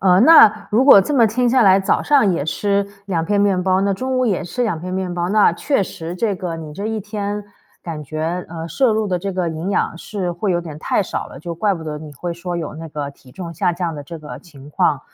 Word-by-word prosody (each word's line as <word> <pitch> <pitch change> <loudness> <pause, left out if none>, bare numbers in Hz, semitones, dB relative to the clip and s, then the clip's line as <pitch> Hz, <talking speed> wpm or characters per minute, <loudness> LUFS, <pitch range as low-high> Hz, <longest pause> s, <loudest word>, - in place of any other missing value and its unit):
呃， 185 0 +4
那 230 -7 +7
如 235 +5 +3
果 275 -8 +9
这 295 - -2
么 235 -5 +5
听 245 +3 +1
下 255 -1 +4
来， 190 -1 +6
早 190 - +1
上 270 -10 +3
也 145 - -2
吃 200 +5 0 0.2
2 165 -4 -1
片 205 +3 +1
面 195 -3 +2
包， 185 0 +2
那 200 0 +1
中 260 +6 -2
午 255 - +2
也 205 -6 0
吃 245 +8 -3
2 175 -9 -1
片 185 +1 -6
面 185 -2 -2
包， 175 0 -2
那 210 -3 +4
确 240 +5 0
实， 170 -1 -6
这 205 +1 0
个 175 -3 -4
你 155 -2 -8
这 200 +6 -5
一 220 -1 -2
天， 205 0 -4 0.4
感 160 -3 -6
觉， 160 +5 -3
呃， 165 -1 -6
摄 235 - +2
入 215 -1 0
的 180 -1 0
这 195 +2 -4
个 180 -2 -1
营 160 +4 -4
养 170 - -1
是 185 -3 -4
会 185 +2 -1
有 175 - 0
点 155 -3 -8
太 200 - 0
少 - - -4
了， - - -11
就 170 +1 -5
怪 200 +3 +1
不 165 - -8
得 150 -1 -5
你 150 -1 -10
会 175 +5 -4
说 175 +1 -5
有 160 -3 -5
那 160 +1 -8
个 145 -1 -5
体 130 -2 -19
重 170 -3 -7
下 175 +2 0
降 170 -2 -3
的 145 - -7
这 165 +3 -9
个 135 -4 -9
情 145 -3 -15
况。 145 -1 +1
180 Hz, 275 characters per minute, -19 LUFS, 165-205 Hz, 0.4 s, 果